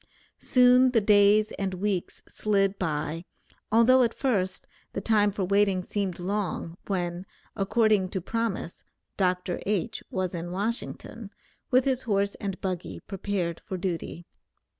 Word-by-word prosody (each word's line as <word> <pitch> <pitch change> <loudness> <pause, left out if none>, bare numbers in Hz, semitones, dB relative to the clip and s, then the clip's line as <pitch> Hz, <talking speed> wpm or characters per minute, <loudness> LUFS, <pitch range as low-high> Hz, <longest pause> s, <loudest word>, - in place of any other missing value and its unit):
Soon 250 0 +5
the 230 - +5
days 210 0 +4
and 190 -1 -2
weeks 190 -1 -2
slid 195 -2 0
by, 155 -1 -2 0.5
although 235 +4 +6
at 235 - +1
first 195 -9 -1 0.3
the - - -2
time 210 -1 +3
for 200 -1 -3
waiting 200 -1 +2
seemed 195 -2 -2
long, 185 -2 -3
when, 175 -2 -2 0.3
according 205 -1 +2
to 190 - -3
promise, 220 -2 -3 0.3
Dr. 180 -2 0
H. 210 +2 -1
was 185 -2 -2
in 170 0 -4
Washington, 215 +2 -4 0.4
with 255 0 +4
his 260 -2 +1
horse 200 -3 0
and 195 -2 -3
buggy 185 -2 -4
prepared 190 -3 -3
for 190 - -5
duty. 175 -1 -4
195 Hz, 135 wpm, -27 LUFS, 180-215 Hz, 0.5 s, although